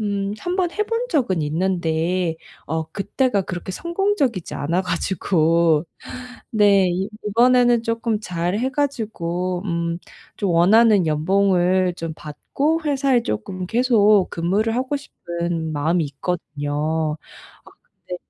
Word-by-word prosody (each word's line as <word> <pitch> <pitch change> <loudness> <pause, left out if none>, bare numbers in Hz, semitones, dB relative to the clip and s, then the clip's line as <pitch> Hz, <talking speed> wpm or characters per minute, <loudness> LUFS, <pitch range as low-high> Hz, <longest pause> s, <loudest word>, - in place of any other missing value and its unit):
음 200 -1 -2
한번 355 -1 -1
해본 455 +4 -1
적은 195 - +1
있는데 170 +1 0 0.3
어 160 +1 -1
그때가 205 +2 0
그렇게 180 +1 -6
성공적이지 340 - -1
않아 170 +6 -1
가지고 170 -3 +1 0.7
네 205 -3 +4
이 190 +3 -2 0.2
이번에는 240 +2 +4
쪼끔 230 -1 -1
잘 180 0 -2
해 255 - 0
가지고 185 -10 -2
음 170 -2 -2 0.4
좀 200 - -1
원하는 195 +2 +5
연봉을 185 +2 +2
좀 165 -2 -4
받고 280 - -2
회사에 275 -4 +2
쪼끔 180 - -4
계속 215 -4 +3
근무를 200 +7 0
하고 260 +3 -1
싶은 170 - -4
마음이 160 +3 +1
있거든요. 150 0 -2 0.5
아 - - -16
근데 180 - -10
185 Hz, 245 characters per minute, -21 LUFS, 170-230 Hz, 0.7 s, 원하는